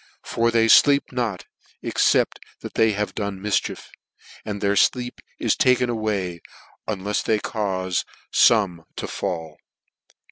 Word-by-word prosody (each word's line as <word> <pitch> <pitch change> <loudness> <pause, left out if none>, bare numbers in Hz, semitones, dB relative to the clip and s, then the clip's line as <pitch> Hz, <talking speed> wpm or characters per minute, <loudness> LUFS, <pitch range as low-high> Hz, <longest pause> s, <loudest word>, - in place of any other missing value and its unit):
For 115 0 0
they 115 -1 +3
fleep 140 +5 +5
not 120 -7 -3 0.4
except - - +2 0.2
" - - -35
they 110 -1 +3
have 105 +1 -2
done 100 -2 -4
mifchief; 105 +1 -2 0.5
and 105 -1 -5
their 100 0 +1
fleep 125 +4 +1 0.2
ii - - -5
i( - - 0
taken 125 -1 +3
away, 100 -6 -2 0.5
unlefs 105 0 -2
they 110 - +1
caufe 95 -4 -2 0.3
Ibmeto 95 -8 +2
FALL." 80 -3 -4
105 Hz, 130 wpm, -23 LUFS, 95-115 Hz, 0.5 s, fleep